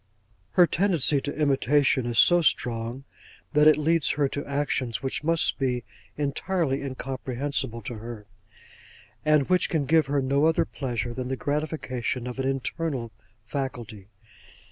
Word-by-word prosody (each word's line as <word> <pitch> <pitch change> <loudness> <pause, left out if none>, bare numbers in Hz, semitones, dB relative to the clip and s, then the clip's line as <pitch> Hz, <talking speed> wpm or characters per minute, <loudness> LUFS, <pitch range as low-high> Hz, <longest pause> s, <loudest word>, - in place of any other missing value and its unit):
'Her 180 - +6
tendency 165 -6 +2
to 145 - -5
imitation 140 -3 +2
is 120 -1 -2
so 175 +10 +6
strong, 120 -3 0 0.5
that 150 +1 +5
it 155 - +7
leads 160 +1 +2
her 145 -1 +1
to 145 - -4
actions 140 -4 -2
which 135 +3 -3
must 165 0 +1
be 125 -3 -1 0.3
entirely 150 0 -1
incomprehensible 130 -2 -3
to 115 +2 -6
her, 115 -2 -8 1.0
and 150 -3 +3
which 180 -1 +2
can 155 -4 0
give 155 0 +3
her 140 0 +1
no 140 +3 +2
other 160 - +2
pleasure 120 -4 -4
than 130 0 -4
the 130 - -2
gratification 145 -5 -3
of 125 +1 -6
an 135 - 0
internal 135 -2 -3 0.3
faculty. 120 -7 -5
135 Hz, 145 wpm, -26 LUFS, 125-150 Hz, 1.0 s, it